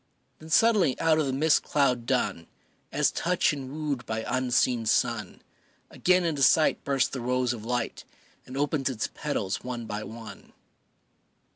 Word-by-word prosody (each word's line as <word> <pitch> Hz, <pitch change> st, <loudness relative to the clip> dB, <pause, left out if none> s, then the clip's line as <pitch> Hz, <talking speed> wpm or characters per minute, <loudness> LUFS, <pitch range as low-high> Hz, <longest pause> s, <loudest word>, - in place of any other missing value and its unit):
Then 160 Hz, -, -12 dB
suddenly 205 Hz, -, +3 dB
out 160 Hz, -1 st, +3 dB
of 150 Hz, -, +1 dB
the -, -, 0 dB
mist 150 Hz, +4 st, +3 dB
cloud 125 Hz, -5 st, 0 dB
dun, 100 Hz, -10 st, -1 dB, 0.4 s
As -, -, +2 dB
touched 175 Hz, -2 st, +1 dB
and 135 Hz, -3 st, -6 dB
wooed 145 Hz, -4 st, -3 dB
by 110 Hz, 0 st, -3 dB
unseen 125 Hz, -2 st, +1 dB
sun, -, -, 0 dB, 0.5 s
Again 180 Hz, 0 st, +2 dB
into 155 Hz, -4 st, -1 dB
sight 155 Hz, +3 st, +4 dB
bursts 135 Hz, -2 st, +1 dB
the 130 Hz, -, -5 dB
rose 125 Hz, 0 st, 0 dB
of 110 Hz, -2 st, -8 dB
light 125 Hz, +1 st, -2 dB, 0.4 s
And 130 Hz, -, -7 dB
opens 145 Hz, -1 st, 0 dB
its 110 Hz, -5 st, -2 dB
petals 110 Hz, -9 st, -3 dB
one 120 Hz, -2 st, -5 dB
by 105 Hz, 0 st, -5 dB
one. 110 Hz, -3 st, -10 dB
130 Hz, 155 wpm, -27 LUFS, 120-150 Hz, 0.5 s, sight